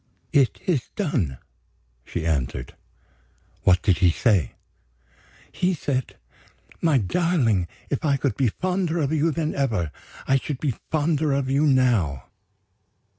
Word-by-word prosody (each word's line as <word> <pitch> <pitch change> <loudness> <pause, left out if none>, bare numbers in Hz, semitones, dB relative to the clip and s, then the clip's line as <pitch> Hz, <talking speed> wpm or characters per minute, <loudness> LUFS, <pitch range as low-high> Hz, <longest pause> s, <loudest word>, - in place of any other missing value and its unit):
"It 135 -4 +3
is 160 -9 0
done," 120 - -1 0.7
she 80 +5 -4
answered. 70 -7 -2 0.9
"What 90 -1 +4
did 95 -4 +2
he 90 - +5
say?" 90 - +2 1.0
"He 180 0 0
said: 130 -4 -2 0.7
'My 160 -4 +3
darling, 120 - +1 0.2
if 140 - -1
I 140 -3 +2
could 135 0 -1
be 135 - +2
fonder 180 - -1
of 150 -2 0
you 160 +1 +2
than 160 0 -1
ever, 110 - -1 0.4
I 135 - +4
should 135 0 -4
be 140 -5 0 0.2
fonder 155 -1 +1
of 135 -1 0
you 145 +3 +3
now. 115 - +2
135 Hz, 130 wpm, -24 LUFS, 100-155 Hz, 1.0 s, he